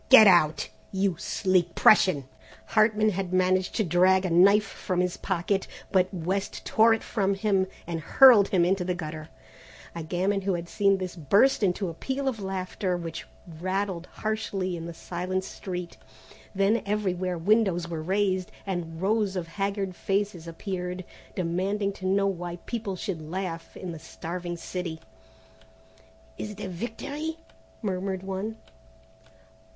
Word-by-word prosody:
Get 260 Hz, -5 st, +10 dB
out, 165 Hz, -5 st, +4 dB, 0.2 s
you 195 Hz, -2 st, +1 dB
sleek 180 Hz, -2 st, +1 dB
Prussian!" 180 Hz, -10 st, +5 dB, 0.4 s
Hartman 215 Hz, 0 st, +4 dB
had 190 Hz, -1 st, -3 dB
managed 185 Hz, 0 st, +2 dB
to 220 Hz, -, +2 dB
drag 185 Hz, +2 st, +4 dB
a 180 Hz, -, -1 dB
knife 200 Hz, +5 st, +6 dB
from 185 Hz, -2 st, -3 dB
his 180 Hz, -1 st, +1 dB
pocket, 190 Hz, +1 st, -1 dB, 0.2 s
but 185 Hz, -1 st, +3 dB
West 190 Hz, +2 st, -3 dB
tore 225 Hz, +1 st, +5 dB
it 225 Hz, -, -8 dB
from 200 Hz, -3 st, 0 dB
him 195 Hz, -2 st, +1 dB, 0.2 s
and 170 Hz, -1 st, -3 dB
hurled 230 Hz, -, +7 dB
him 175 Hz, -3 st, +3 dB
into 185 Hz, +1 st, +1 dB
the 180 Hz, 0 st, -1 dB
gutter. 155 Hz, -2 st, -6 dB, 0.6 s
A 170 Hz, -, -5 dB
gamin 185 Hz, +5 st, 0 dB
who 190 Hz, -1 st, 0 dB
had 170 Hz, 0 st, -5 dB
seen 195 Hz, +2 st, +2 dB
this 185 Hz, -2 st, -5 dB
burst 200 Hz, -, +3 dB
into 190 Hz, 0 st, +1 dB
a 165 Hz, -, -4 dB
peal 270 Hz, +10 st, -3 dB
of 245 Hz, -5 st, -1 dB
laughter, 185 Hz, -1 st, -2 dB
which 165 Hz, -2 st, -6 dB, 0.3 s
rattled 185 Hz, -1 st, -2 dB
harshly 205 Hz, -4 st, -2 dB
in 165 Hz, 0 st, -6 dB
the 170 Hz, -, -6 dB
silent 185 Hz, +3 st, -3 dB
street. 180 Hz, -2 st, -6 dB, 0.6 s
Then 200 Hz, +3 st, +3 dB
everywhere 185 Hz, -3 st, -1 dB
windows 190 Hz, -1 st, +2 dB
were 165 Hz, -2 st, -4 dB
raised 190 Hz, +1 st, 0 dB
and 175 Hz, -3 st, -4 dB
rows 205 Hz, -1 st, +1 dB
of 170 Hz, -2 st, -3 dB
haggard 195 Hz, 0 st, -2 dB
faces 195 Hz, -4 st, -1 dB
appeared 180 Hz, +1 st, -4 dB, 0.3 s
demanding 195 Hz, +3 st, -1 dB
to 185 Hz, -, -2 dB
know 195 Hz, +1 st, +3 dB
why 175 Hz, -3 st, -2 dB
people 215 Hz, -5 st, -3 dB
should 180 Hz, -3 st, -4 dB
laugh 165 Hz, +1 st, -5 dB
in 185 Hz, -, -5 dB
the 165 Hz, -, -7 dB
starving 175 Hz, +2 st, -6 dB
city. 170 Hz, -1 st, -5 dB, 1.4 s
"Is 210 Hz, -, -4 dB
it 210 Hz, -1 st, -9 dB
a 195 Hz, -, -4 dB
victory?" 280 Hz, -, -5 dB, 0.5 s
murmured 190 Hz, -1 st, -2 dB
one. 195 Hz, +3 st, -4 dB
185 Hz, 150 wpm, -27 LUFS, 175-200 Hz, 1.4 s, Get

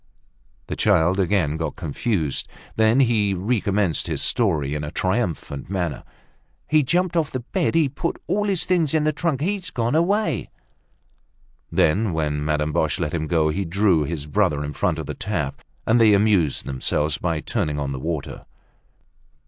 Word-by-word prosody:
The -, -, -4 dB
child 95 Hz, -2 st, +3 dB
again 90 Hz, -5 st, +1 dB
got 80 Hz, -2 st, -3 dB
confused. 80 Hz, -, -2 dB, 0.3 s
Then 110 Hz, +4 st, +4 dB
he 110 Hz, -6 st, +2 dB
recommenced 100 Hz, -, 0 dB
his -, -, -2 dB
story 80 Hz, -, +1 dB
in 75 Hz, 0 st, -3 dB
a 75 Hz, -, -4 dB
triumphant 90 Hz, -, -2 dB
manner: 90 Hz, -6 st, -2 dB, 0.6 s
"He 155 Hz, 0 st, +4 dB
jumped 175 Hz, +5 st, +1 dB
off 160 Hz, -4 st, +1 dB
the 130 Hz, -, -4 dB
bed, 165 Hz, +7 st, -1 dB
he 160 Hz, -3 st, +4 dB
put 165 Hz, +6 st, -3 dB
all 210 Hz, +1 st, 0 dB
the 200 Hz, -2 st, +1 dB
things 170 Hz, -4 st, +1 dB
in 155 Hz, -, +2 dB
the 155 Hz, 0 st, +1 dB
trunk. 150 Hz, -3 st, -1 dB
He's 185 Hz, +1 st, -2 dB
gone 120 Hz, -3 st, -1 dB
away." 170 Hz, -, +1 dB, 1.2 s
Then, 95 Hz, +4 st, +2 dB
when 75 Hz, -2 st, -1 dB
Madame 75 Hz, 0 st, 0 dB
Boche -, -, +1 dB
let 75 Hz, -, -2 dB
him 80 Hz, -2 st, -2 dB
go, 80 Hz, -1 st, +2 dB
he 95 Hz, +6 st, -1 dB
drew 90 Hz, -2 st, +2 dB
his 75 Hz, -1 st, -4 dB
brother 75 Hz, 0 st, +1 dB
in 75 Hz, -, -5 dB
front 85 Hz, +1 st, 0 dB
of 80 Hz, -, -4 dB
the -, -, -4 dB
tap, 75 Hz, -10 st, -3 dB, 0.2 s
and 115 Hz, +1 st, +4 dB
they 110 Hz, -2 st, +6 dB
amused 100 Hz, -8 st, +2 dB
themselves 75 Hz, +3 st, -1 dB
by 85 Hz, -3 st, -1 dB
turning 75 Hz, 0 st, -2 dB
on 70 Hz, -1 st, -2 dB
the 65 Hz, -, -4 dB
water. 80 Hz, 0 st, -5 dB
95 Hz, 170 wpm, -23 LUFS, 75-130 Hz, 1.2 s, they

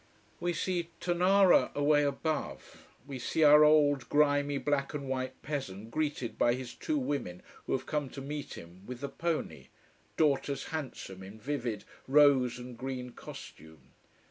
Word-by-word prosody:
We 175 Hz, 0 st, -1 dB
see 170 Hz, 0 st, -2 dB
Tonara 180 Hz, +2 st, +4 dB
away 145 Hz, +1 st, +3 dB
above. 145 Hz, +2 st, -3 dB, 0.2 s
We 135 Hz, -2 st, -7 dB
see 155 Hz, +6 st, 0 dB
our 150 Hz, 0 st, +8 dB
old 145 Hz, -3 st, +4 dB
grimy 145 Hz, -1 st, +2 dB
black 145 Hz, 0 st, -1 dB
and 140 Hz, -2 st, -4 dB
white 130 Hz, 0 st, -3 dB
peasant 115 Hz, -8 st, -5 dB
greeted 145 Hz, -5 st, -2 dB
by 120 Hz, 0 st, +4 dB
his 130 Hz, -1 st, -7 dB
two 310 Hz, -, -2 dB
women 140 Hz, -, -3 dB, 0.2 s
who -, -, -1 dB
have 130 Hz, -, -1 dB
come 150 Hz, -3 st, -2 dB
to -, -, -3 dB
meet 145 Hz, +1 st, -6 dB
him 85 Hz, +3 st, -12 dB
with 125 Hz, 0 st, -7 dB
the 140 Hz, -, -3 dB
pony 170 Hz, -1 st, -3 dB, 0.5 s
daughters 140 Hz, -2 st, +1 dB
handsome 130 Hz, -10 st, -6 dB
in 100 Hz, +3 st, -11 dB
vivid 120 Hz, -3 st, -3 dB, 0.2 s
rose 135 Hz, -3 st, +5 dB
and 125 Hz, 0 st, -9 dB
green 125 Hz, 0 st, -5 dB
costume. 80 Hz, -, -12 dB
140 Hz, 150 wpm, -31 LUFS, 125-150 Hz, 0.5 s, our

